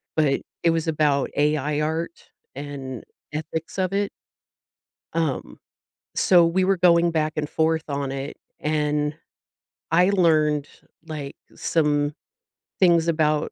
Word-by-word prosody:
but 145 Hz, -3 st, +2 dB, 0.2 s
it 170 Hz, -, +5 dB
was 165 Hz, 0 st, -1 dB
about 150 Hz, -3 st, +2 dB
AI 150 Hz, 0 st, +1 dB
art 160 Hz, +2 st, -3 dB, 0.3 s
and 135 Hz, -3 st, -6 dB, 0.3 s
ethics 160 Hz, +3 st, -5 dB
of 185 Hz, 0 st, 0 dB
it. 200 Hz, 0 st, +1 dB, 1.0 s
Um, 150 Hz, -, -2 dB, 0.6 s
so 175 Hz, -2 st, +5 dB
we 175 Hz, +3 st, +2 dB
were 190 Hz, +1 st, +2 dB
going 170 Hz, -1 st, +4 dB
back 155 Hz, -1 st, 0 dB
and 150 Hz, -1 st, -2 dB
forth 160 Hz, 0 st, +1 dB
on 140 Hz, -1 st, -2 dB
it, 135 Hz, +1 st, -5 dB, 0.2 s
and 150 Hz, -1 st, 0 dB, 0.8 s
I 180 Hz, +3 st, +5 dB
learned, 155 Hz, -6 st, +3 dB, 0.4 s
like, 150 Hz, -4 st, -6 dB, 0.2 s
some 150 Hz, -2 st, +1 dB, 0.7 s
things 170 Hz, -3 st, +4 dB
about 155 Hz, -2 st, +1 dB
155 Hz, 120 wpm, -24 LUFS, 145-165 Hz, 1.0 s, it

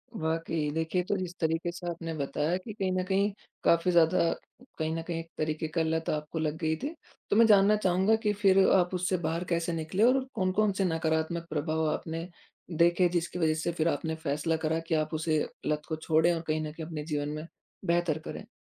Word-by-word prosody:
वाक़ई। 160 Hz, -2 st, -1 dB
देखिए 160 Hz, +3 st, 0 dB
तो 200 Hz, -, -1 dB
इस 180 Hz, 0 st, -7 dB
तरीके 165 Hz, +1 st, 0 dB
से 175 Hz, 0 st, -8 dB
आपने 165 Hz, -1 st, -4 dB
बताया 150 Hz, +4 st, -1 dB
कि 205 Hz, +3 st, -8 dB
कहीं 190 Hz, -2 st, -1 dB
न 185 Hz, 0 st, 0 dB
कहीं 200 Hz, +2 st, +1 dB, 0.3 s
काफ़ी 170 Hz, +2 st, +4 dB
ज़्यादा 170 Hz, 0 st, +4 dB, 0.5 s
कहीं 160 Hz, 0 st, 0 dB
न 165 Hz, -, -2 dB
कहीं 170 Hz, -1 st, -2 dB
एक 165 Hz, 0 st, -8 dB
तरीके 155 Hz, 0 st, -1 dB
का 165 Hz, +1 st, -1 dB
लत 160 Hz, 0 st, -1 dB
आपको 150 Hz, +1 st, -2 dB
लग 155 Hz, 0 st, -1 dB
गई 160 Hz, 0 st, 0 dB
थी, 310 Hz, +4 st, -3 dB, 0.3 s
तो -, -, +2 dB
मैं 230 Hz, +1 st, +7 dB
जानना 205 Hz, -1 st, +6 dB
चाहूँगा 190 Hz, +1 st, +3 dB
कि 210 Hz, 0 st, +2 dB
फिर 195 Hz, -1 st, +4 dB, 0.2 s
आप 180 Hz, -1 st, +2 dB
उससे 180 Hz, +1 st, 0 dB
बाहर 165 Hz, +2 st, -1 dB
कैसे 170 Hz, 0 st, 0 dB
निकले, 165 Hz, +6 st, -1 dB
और 260 Hz, +2 st, +4 dB
कौन-कौन 195 Hz, +3 st, +2 dB
से 195 Hz, 0 st, 0 dB
नकारात्मक 165 Hz, 0 st, -1 dB
प्रभाव 155 Hz, +1 st, -1 dB
आपने 165 Hz, +2 st, -4 dB, 0.5 s
देखे 175 Hz, +1 st, +4 dB
जिसकी 175 Hz, +1 st, -2 dB
वज़ह 160 Hz, -2 st, +3 dB
से 160 Hz, +2 st, -1 dB
फिर 165 Hz, -1 st, 0 dB
आपने 160 Hz, +1 st, -1 dB
फैसला 150 Hz, +3 st, 0 dB
करा 160 Hz, +1 st, +1 dB
कि 160 Hz, -, +1 dB
आप 155 Hz, +1 st, -1 dB
उसे 155 Hz, -1 st, +1 dB, 0.2 s
लत 150 Hz, 0 st, 0 dB
को 160 Hz, -, -2 dB
छोड़ें 160 Hz, +2 st, +2 dB
और 165 Hz, -, -2 dB
कहीं 155 Hz, 0 st, 0 dB
न 155 Hz, -1 st, -4 dB
कहीं 160 Hz, +1 st, -7 dB
अपने 155 Hz, -2 st, -5 dB
जीवन 145 Hz, -2 st, -2 dB
में 155 Hz, +1 st, -5 dB, 0.4 s
बेहतर 170 Hz, -2 st, +1 dB
करें? 205 Hz, +6 st, -8 dB
165 Hz, 210 wpm, -29 LUFS, 160-180 Hz, 0.5 s, मैं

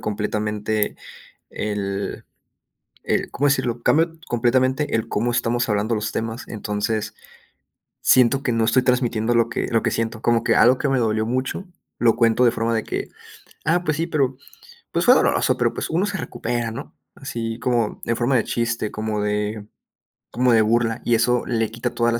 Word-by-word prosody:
completamente 105 Hz, 0 st, -2 dB, 0.5 s
el 100 Hz, -1 st, -4 dB, 0.8 s
el, -, -, -1 dB
¿cómo 145 Hz, -, +1 dB
decirlo?, 120 Hz, -4 st, 0 dB
cambio 165 Hz, +6 st, +2 dB
completamente 130 Hz, +4 st, +1 dB
el 115 Hz, 0 st, -1 dB
cómo 115 Hz, +2 st, 0 dB
estamos 120 Hz, 0 st, 0 dB
hablando 105 Hz, +1 st, 0 dB
los 105 Hz, 0 st, -2 dB
temas, 115 Hz, +2 st, -4 dB
entonces, 105 Hz, 0 st, -3 dB, 0.9 s
siento 130 Hz, +2 st, +4 dB
que 125 Hz, -, 0 dB
no 115 Hz, -1 st, +1 dB
estoy 120 Hz, +3 st, +3 dB
transmitiendo 120 Hz, -2 st, +1 dB
lo 115 Hz, -1 st, +2 dB
que -, -, -2 dB
lo 115 Hz, -1 st, +2 dB
que -, -, +1 dB
siento, 115 Hz, -1 st, -2 dB
como 120 Hz, -1 st, +2 dB
que -, -, +2 dB
algo 125 Hz, +4 st, +5 dB
que 145 Hz, -, -1 dB
me 135 Hz, -1 st, +2 dB
dolió 110 Hz, -2 st, +1 dB
mucho 130 Hz, +10 st, -2 dB, 0.3 s
lo 115 Hz, -1 st, +3 dB
cuento 115 Hz, +1 st, +3 dB
de 120 Hz, -, +5 dB
forma 115 Hz, 0 st, -1 dB
de 110 Hz, -1 st, 0 dB
que: -, -, -4 dB, 0.6 s
"Ah, 175 Hz, +2 st, +2 dB
pues 155 Hz, -4 st, -1 dB
sí, 165 Hz, +1 st, -1 dB
pero, 135 Hz, -6 st, 0 dB, 0.6 s
pues -, -, +1 dB
fue -, -, +8 dB
doloroso, -, -, +2 dB
pero, -, -, +1 dB
pues -, -, -4 dB
uno 170 Hz, +4 st, +1 dB
se 205 Hz, -2 st, -2 dB
recupera, 120 Hz, -6 st, -3 dB
¿no?", 135 Hz, +6 st, -8 dB, 0.2 s
así 115 Hz, -4 st, -5 dB
como 120 Hz, -4 st, 0 dB
en 115 Hz, -, 0 dB
forma 125 Hz, +3 st, +1 dB
de 115 Hz, -, +2 dB
chiste, 115 Hz, -2 st, -1 dB
como 110 Hz, -1 st, -3 dB
de 105 Hz, 0 st, -2 dB, 0.7 s
como 125 Hz, +2 st, +2 dB
de 115 Hz, -1 st, +5 dB
burla, 115 Hz, +1 st, +1 dB
y 120 Hz, -, +3 dB
eso 120 Hz, +1 st, +2 dB
le 115 Hz, -3 st, 0 dB
quita 115 Hz, +1 st, -3 dB
toda 120 Hz, 0 st, +1 dB
la 115 Hz, -, 0 dB
115 Hz, 180 wpm, -22 LUFS, 110-125 Hz, 0.9 s, fue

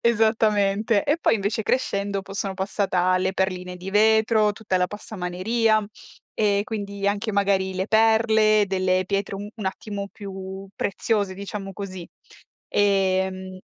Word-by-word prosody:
esattamente. 215 Hz, -2 st, +2 dB
E 295 Hz, -, +2 dB
poi -, -, +3 dB
invece 205 Hz, +2 st, -1 dB
crescendo 200 Hz, -5 st, -1 dB
poi 195 Hz, -, -10 dB
sono 195 Hz, -1 st, -2 dB
passata 190 Hz, 0 st, -1 dB
alle 185 Hz, +1 st, +1 dB
perline 185 Hz, -1 st, -2 dB
di 185 Hz, +2 st, -7 dB
vetro, 220 Hz, +1 st, +4 dB
tutta 205 Hz, -3 st, -2 dB
la 180 Hz, 0 st, +2 dB
passamaneria 210 Hz, +2 st, 0 dB, 0.5 s
e 205 Hz, -2 st, +2 dB
quindi 200 Hz, -2 st, -4 dB
anche 205 Hz, +2 st, -1 dB
magari 195 Hz, -1 st, +1 dB
le 190 Hz, +1 st, -2 dB
perle, 220 Hz, -1 st, +4 dB
delle 185 Hz, -1 st, +1 dB
pietre 200 Hz, 0 st, -2 dB
un 205 Hz, +1 st, -7 dB
attimo 200 Hz, +1 st, -4 dB
più 195 Hz, -1 st, -8 dB
preziose, 200 Hz, -1 st, -1 dB
diciamo 195 Hz, 0 st, -6 dB
così. 190 Hz, -3 st, -7 dB, 0.7 s
Ehm 190 Hz, -2 st, +1 dB
200 Hz, 130 wpm, -24 LUFS, 190-215 Hz, 0.7 s, vetro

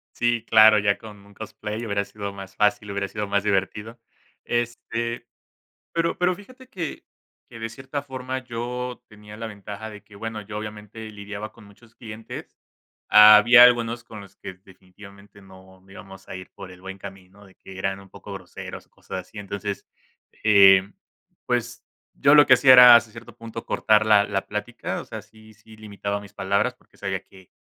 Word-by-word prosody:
Sí 120 Hz, -1 st, 0 dB
claro, 110 Hz, -1 st, +7 dB
ya 100 Hz, 0 st, +1 dB
con 105 Hz, -2 st, -13 dB
un 100 Hz, -, -19 dB
cosplay 110 Hz, +1 st, -7 dB
hubiera 100 Hz, -2 st, -1 dB
sido 100 Hz, 0 st, -7 dB
más 95 Hz, -1 st, -11 dB
fácil, 105 Hz, 0 st, +1 dB
hubiera 100 Hz, 0 st, -3 dB
sido 105 Hz, +1 st, -5 dB
más 100 Hz, 0 st, 0 dB
divertido, 105 Hz, +3 st, -2 dB, 0.5 s
este, 120 Hz, 0 st, -3 dB, 0.7 s
pero 165 Hz, 0 st, -1 dB
pero, 180 Hz, +1 st, +2 dB
fíjate 255 Hz, +7 st, -16 dB
que 175 Hz, -, -6 dB, 0.5 s
que 115 Hz, -, -11 dB
de 115 Hz, 0 st, -4 dB
cierta 130 Hz, +5 st, -6 dB
forma 130 Hz, -1 st, -5 dB
yo 125 Hz, +1 st, -5 dB
tenía 105 Hz, -1 st, -14 dB
la 115 Hz, +1 st, -6 dB
ventaja 105 Hz, +1 st, -9 dB
de 105 Hz, -2 st, -12 dB
que 105 Hz, -, -19 dB
bueno 110 Hz, +1 st, -6 dB
yo 105 Hz, +1 st, -9 dB
obviamente 105 Hz, +1 st, -8 dB
lidiaba 105 Hz, +1 st, -8 dB
con 115 Hz, -, -17 dB
muchos 110 Hz, +3 st, -20 dB
clientes. 110 Hz, -1 st, -10 dB, 0.5 s
Había 105 Hz, +3 st, +8 dB
algunos 120 Hz, -1 st, +3 dB
con 110 Hz, -2 st, -11 dB
los 100 Hz, -1 st, -16 dB
que 100 Hz, -, -9 dB
definitivamente, 100 Hz, +2 st, -17 dB
no 95 Hz, -1 st, -18 dB
íbamos 95 Hz, 0 st, -13 dB
a -, -, -8 dB
ir 95 Hz, 0 st, -10 dB
por 95 Hz, -2 st, -11 dB
el 90 Hz, 0 st, -15 dB
buen 95 Hz, +1 st, -8 dB
camino, 95 Hz, +1 st, -13 dB
de 95 Hz, -, -20 dB
que 95 Hz, -, -13 dB
eran 95 Hz, +1 st, -3 dB
un 100 Hz, 0 st, -16 dB
poco 100 Hz, +1 st, -11 dB
groseros 95 Hz, -2 st, -9 dB
o -, -, -43 dB
cosas -, -, -8 dB
así. 110 Hz, -, -15 dB
Entonces, 100 Hz, 0 st, -6 dB, 0.6 s
eh, 95 Hz, -2 st, +6 dB, 0.6 s
pues, -, -, -3 dB, 0.3 s
yo 140 Hz, +2 st, +4 dB
lo 145 Hz, -1 st, +8 dB
que 130 Hz, -, +8 dB
hacía 130 Hz, +1 st, +6 dB
era, 125 Hz, -1 st, +10 dB
hasta 115 Hz, -2 st, +2 dB
cierto 115 Hz, 0 st, -13 dB
punto, 115 Hz, 0 st, -9 dB
cortar 110 Hz, -1 st, +2 dB
la 105 Hz, -2 st, +6 dB
la 100 Hz, -1 st, -3 dB
plática, 105 Hz, +3 st, -5 dB
o -, -, -13 dB
sea, -, -, -8 dB
sí 110 Hz, 0 st, -19 dB
sí 110 Hz, +1 st, -18 dB
limitaba 100 Hz, -1 st, -5 dB
mis 100 Hz, -, -14 dB
palabras, 100 Hz, +6 st, 0 dB
porque, -, -, -29 dB
sabía 95 Hz, -1 st, -4 dB
que 95 Hz, -1 st, -19 dB
105 Hz, 180 wpm, -23 LUFS, 100-115 Hz, 0.7 s, era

